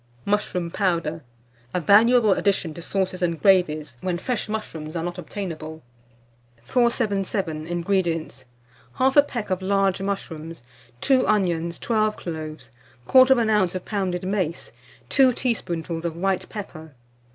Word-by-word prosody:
MUSHROOM 190 -4 -1
POWDER 170 -5 -1 0.5
(a - - +2
valuable 220 +5 +5
addition 195 -6 0
to 170 - -9
Sauces 185 0 -2
and 170 -2 0
Gravies, 155 -9 +2
when 180 -2 -1
fresh 235 +3 -3
Mushrooms 165 -7 -5
are 165 - -2
not 175 +1 -4
obtainable). 160 -4 -6 0.8
477. 195 - 0
INGREDIENTS. 170 -6 -1 0.5
1/2 270 +2 +4
peck 225 -7 -5
of 185 0 0
large 195 0 +1
mushrooms, 165 -6 -5 0.4
2 260 -2 +3
onions, 170 -5 +1
12 215 -2 0
cloves, 155 -3 -7 0.4
1/4 240 -5 +5
oz. 185 -1 -1
of 185 - -5
pounded 190 -4 -2
mace, 185 -4 -2 0.4
2 265 -2 +5
teaspoonfuls 170 - -2
of 170 -2 -3
white 190 +2 -1
pepper. 160 -8 -8
185 Hz, 125 wpm, -24 LUFS, 165-210 Hz, 0.8 s, valuable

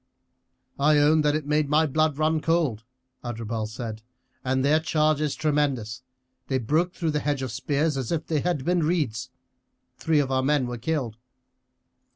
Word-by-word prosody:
"I 150 +2 +4
own 150 +2 +4
that 150 0 +2
it 155 -2 -2
made 150 0 +1
my 155 +2 +4
blood 155 0 +1
run 155 0 +1
cold," 155 -10 0 0.4
Adherbal 115 -2 -3
said; 110 -1 -6 0.4
"and 130 +1 0
their 150 +2 +4
charge 155 -1 +1
is 150 -2 -1
tremendous 140 -8 -1 0.5
they 130 - 0
broke 155 - 0
through 165 -3 -1
the 150 - 0
hedge 145 -2 -1
of 130 - -3
spears 145 +5 0
as 130 -4 -3
if 160 -2 -1
they 155 -2 0
had 160 -5 -1
been 175 0 +2
reeds. 150 -8 -1 0.7
Three 160 -2 +1
of 140 -2 +1
our 130 0 +2
men 140 0 +2
were 120 -1 -5
killed." 125 -5 -2
145 Hz, 175 wpm, -25 LUFS, 130-155 Hz, 0.7 s, I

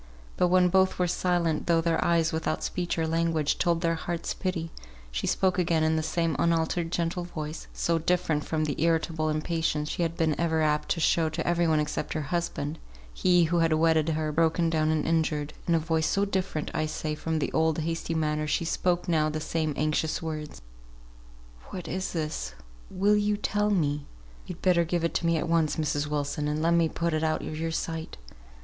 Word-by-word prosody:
But 180 - +3
when 180 0 +4
both 190 +1 +3
were 180 - +2
silent, 175 -2 0
though 170 -1 +4
their 165 0 +1
eyes, 165 -1 +2
without 160 0 -1
speech 175 -2 -2
or 165 - +1
language, 165 -2 0
told 170 -1 +2
their 165 -1 +2
hearts' 170 +1 -3
pity, 170 -4 -3 0.4
she - - -2
spoke 185 -1 +1
again 165 -2 +2
in 160 0 +2
the 160 - +1
same 165 0 0
unaltered 165 0 +1
gentle 175 +1 -1
voice 155 -2 -6
(so 170 -1 0
different 165 -2 0
from 155 -1 -1
the 145 -1 -3
irritable 160 -1 +1
impatience 155 -1 -1
she - - -3
had 165 0 -1
been 160 -2 +2
ever 160 -2 +1
apt 150 0 +1
to - - 0
show 165 0 +2
to - - -4
every 170 0 +2
one 155 -1 +3
except 150 0 -2
her 155 - -2
husband, 165 -3 -2 0.3
he 180 - +4
who 170 +1 +1
had 165 -1 +3
wedded 160 0 +3
her, 155 -1 -1
broken 165 +1 +2
down 155 -1 +1
and 155 -1 +1
injured) 155 -2 0
in 170 - +3
a - - +3
voice 160 0 0
so 200 0 +1
different, 190 -6 -2
I 155 - 0
say, 155 0 -3
from 160 +1 -2
the 155 - -1
old, 160 -1 +2
hasty 165 +1 -2
manner, 155 -1 0
she 160 +3 0
spoke 175 +2 0
now 155 -3 +2
the 155 0 -3
same 155 0 -1
anxious 155 +1 0
words, 155 - -6 1.1
"What 180 - -6
is 185 +1 -3
this? 155 - -3 0.3
Will 200 +3 +2
you 210 0 +1
tell 210 0 0
me?" 150 -7 0 0.4
"Yo'd 180 - -8
better 180 -2 +4
give 170 0 -1
it 170 - 0
me 165 -1 +2
at 170 - -2
once, 165 -2 +2
Mrs. 150 -1 -1
Wilson, 150 0 -2
and 150 +1 -1
let 165 +2 +2
me 170 -1 +3
put 170 +1 -1
it 155 0 0
out 155 0 0
of 155 - -5
your 165 0 -1
sight. 160 0 -4
165 Hz, 205 wpm, -27 LUFS, 155-170 Hz, 1.1 s, when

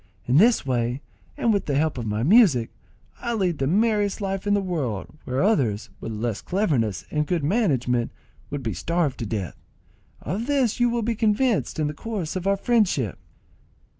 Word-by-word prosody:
In 125 +3 +3
this 225 - +5
way, 120 -1 0 0.4
and 230 - +2
with 200 - -1
the 140 - 0
help 155 +1 +1
of 115 - -4
my 105 +2 -1
music, 165 - +5 0.5
I 235 0 -2
lead 180 -7 0
the 135 - +1
merriest 205 +3 +2
life 195 0 -3
in 205 - +3
the - - +2
world, 150 - -3
where 130 +2 0
others, 130 - +1
with 115 - -5
less 110 0 -3
cleverness 135 - 0
and 150 -1 0
good 170 -3 0
management, 135 - +1 0.4
would 145 -2 -4
be 110 -3 -2
starved 165 - -1
to 115 - -3
death. 100 -5 -4 0.6
Of 210 - -4
this 270 -5 +1
you 240 0 +4
will 235 -1 -1
be 230 +2 0
convinced 220 +1 +1
in 155 - 0
the 150 - -2
course 190 -1 -4
of 185 +1 -2
our 200 0 +3
friendship." 195 - +1
170 Hz, 185 wpm, -24 LUFS, -, 0.6 s, this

